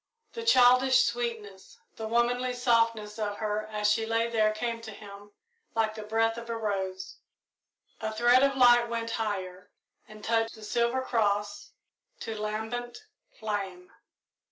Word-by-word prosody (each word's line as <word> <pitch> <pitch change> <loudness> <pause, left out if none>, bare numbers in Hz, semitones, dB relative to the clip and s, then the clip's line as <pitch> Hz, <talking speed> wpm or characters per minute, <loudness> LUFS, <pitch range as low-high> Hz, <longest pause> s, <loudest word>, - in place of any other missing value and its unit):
The 460 - -6
childish 255 - +5
sweetness, 225 -5 -4 0.2
the 220 - -5
womanly 245 +2 +1
softness 230 -3 +1
of 205 -1 -2
her 215 0 -2
as 210 -1 -1
she 225 +1 +1
lay 230 +1 0
there 220 -2 +2
came 230 +1 -3
to 225 - -9
him 205 -1 -12 0.4
like 220 -1 +1
the 215 - -7
breath 225 +2 0
of 235 0 -11
a 230 - -2
rose. 190 -3 -4 0.8
A 220 0 -3
thread 240 +3 +4
of 275 -1 +2
light 240 -2 +6
went 230 -1 -3
higher 190 -5 -4 0.4
and 215 0 -13
touched 225 0 0
the 220 - -13
silver 235 +4 0
cross 205 -4 -1 0.5
to 225 - -5
lambent 220 - -4 0.4
flame. 195 -4 -4
225 Hz, 145 wpm, -28 LUFS, 210-235 Hz, 0.8 s, light